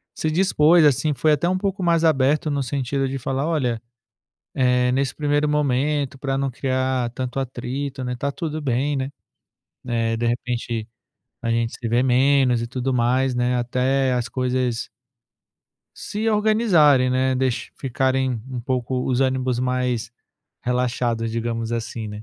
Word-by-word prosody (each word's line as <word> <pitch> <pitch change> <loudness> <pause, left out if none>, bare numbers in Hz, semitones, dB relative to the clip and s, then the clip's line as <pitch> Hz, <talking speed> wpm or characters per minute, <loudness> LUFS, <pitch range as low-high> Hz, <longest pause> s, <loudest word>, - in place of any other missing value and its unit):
se 155 - -1
dispôs, 170 -2 +4
assim, 145 +2 +3
foi 155 +2 +2
até 150 +4 +1
um 185 - +1
pouco 195 0 -2
mais 170 -1 +2
aberto 150 0 +2
no 140 -1 0
sentido 135 +1 -1
de 135 - -3
falar: 135 +3 -2
"Olha, 125 -8 0 0.7
eh, 125 -1 +2
nesse 135 0 0
primeiro 145 0 +1
momento, 145 -1 0
para 135 -1 -2
não 135 0 -1
criar 130 -1 -1
tanto 130 +1 -4
atrito, 130 +2 -4
né, 125 0 -3
tá 140 +3 -2
tudo 155 0 -4
bem, 140 +2 0
né, 135 +1 -2 0.8
eh, 115 -1 0
de 120 - -1
repente 120 -2 -2 0.6
a 115 - -1
gente 115 0 0
se 120 - -5
vê 120 +2 +2
menos 130 -1 +3
e - - -2
tudo 130 +2 -2
mais, 125 +2 +2
né, 125 0 +1
até 130 +2 +1
as 120 -1 -1
coisas" 125 -2 -1 1.1
Se 215 +2 -2
organizarem, 205 - +4
né, 130 +1 +1
deixa 130 -1 -1
ficarem 130 0 0 0.2
um 125 -2 -4
pouco 125 0 -2
os 130 +1 +2
ânimos 130 -2 0
mais 125 -2 -1 0.5
relaxados, 120 -2 -1
digamos 115 0 -2
assim, 115 -1 -4
né? 105 +1 -7
130 Hz, 155 wpm, -22 LUFS, 125-140 Hz, 1.1 s, dispôs